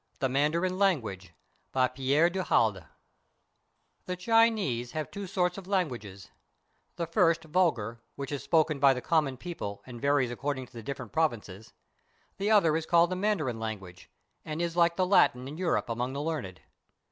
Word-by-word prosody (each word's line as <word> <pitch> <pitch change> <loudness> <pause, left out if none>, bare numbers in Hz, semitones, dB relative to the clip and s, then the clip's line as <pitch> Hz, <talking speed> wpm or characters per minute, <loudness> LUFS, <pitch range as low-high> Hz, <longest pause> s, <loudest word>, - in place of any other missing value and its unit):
THE 130 - 0
MANDARIN 165 +7 +1
LANGUAGE 110 - 0 0.4
BY 130 -1 +3
PERE 140 +6 +2
DU 190 +1 -2
HALDE 110 - +1 1.2
The 180 - -3
Chinese 200 - +2
have 155 -1 -4
two 200 -1 -6
sorts 180 0 0
of 190 - -13
languages; 120 - -3 0.6
the 170 - -2
first 165 -1 +2
vul 175 +3 +3
gar, 115 -1 -7
which 140 0 -6
is 145 - -3
spoken 155 -3 +2
by 135 -1 +5
the 125 - -4
common 150 -5 +1
people 105 - -6
and 120 -2 -10
varies 140 -3 +2
according 135 +1 -3
to - - -23
the 115 - -8
different 130 -2 -6
provinces; 110 -9 -2 0.7
the 200 +2 0
other 195 -8 +4
is 160 0 -2
called 170 0 +4
the - - 0
Mandarin 180 - -1
language 95 -5 -7 0.3
and 155 +1 -5
is 170 -1 -2
like 170 -1 +3
the 185 - +1
Latin 130 -9 +3
in 150 +4 -8
Europe 165 - 0
among 120 +2 -2
the 140 - -3
learned. 145 - -4
145 Hz, 170 wpm, -29 LUFS, 120-175 Hz, 1.2 s, by